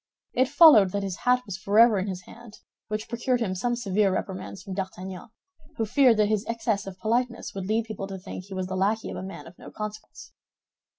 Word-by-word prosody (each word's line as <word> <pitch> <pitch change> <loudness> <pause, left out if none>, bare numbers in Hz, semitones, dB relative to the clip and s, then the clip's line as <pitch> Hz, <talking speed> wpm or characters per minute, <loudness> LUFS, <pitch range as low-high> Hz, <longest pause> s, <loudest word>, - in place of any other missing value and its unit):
It 255 0 +2
followed 290 - +7
that 200 0 -1
his 190 -2 -4
hat 250 0 +2
was 190 -2 -6
forever 210 +2 +5
in 190 - -2
his 185 -2 -5
hand, 230 +2 -14 0.3
which 215 0 -4
procured 240 +2 0
him 210 -6 -1
some 240 +6 -1
severe 205 -4 +1
reprimands 185 0 -5
from 195 - -7
D'Artagnan, 190 +1 -6 0.5
who 225 - 0
feared 245 0 +4
that 210 - +4
his 210 -1 0
excess 225 -3 -1
of 190 -1 -8
politeness 235 +3 -1
would 195 -1 -5
lead 220 +2 +1
people 215 -3 -6
to 195 -1 -6
think 185 -1 -8
he 195 -1 -8
was 185 0 -2
the 185 +1 -4
lackey 205 +4 0
of - - -6
a - - -5
man 190 -6 -8
of 170 +2 -15
no - - -10
consequence. 215 0 -8
210 Hz, 220 wpm, -26 LUFS, 190-230 Hz, 0.5 s, followed